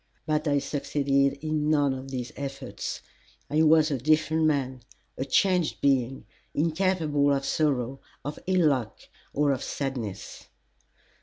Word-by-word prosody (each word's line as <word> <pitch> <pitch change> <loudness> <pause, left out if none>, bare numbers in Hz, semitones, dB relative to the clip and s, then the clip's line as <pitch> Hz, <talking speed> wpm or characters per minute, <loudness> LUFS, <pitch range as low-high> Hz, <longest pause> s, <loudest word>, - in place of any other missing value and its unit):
But 155 0 0
I 145 -1 +3
succeeded 140 -1 +1
in 155 -1 0
none 145 -3 +3
of 130 +1 -7
these 125 -2 -4
efforts. 140 -1 -5 0.5
I 155 +2 +3
was 155 0 +5
a 135 - 0
different 155 +3 +2
man, 135 -4 0 0.3
a - - -2
changed 180 +4 +2
being, 135 -3 +1 0.3
incapable 155 -3 +1
of 140 -1 0
sorrow, 135 -4 0 0.3
of 145 +1 -5
ill 180 -4 +4
luck, 125 -6 -1 0.3
or 145 0 +2
of 135 -1 -1
sadness. 115 -8 -5
145 Hz, 135 wpm, -27 LUFS, 135-155 Hz, 0.5 s, was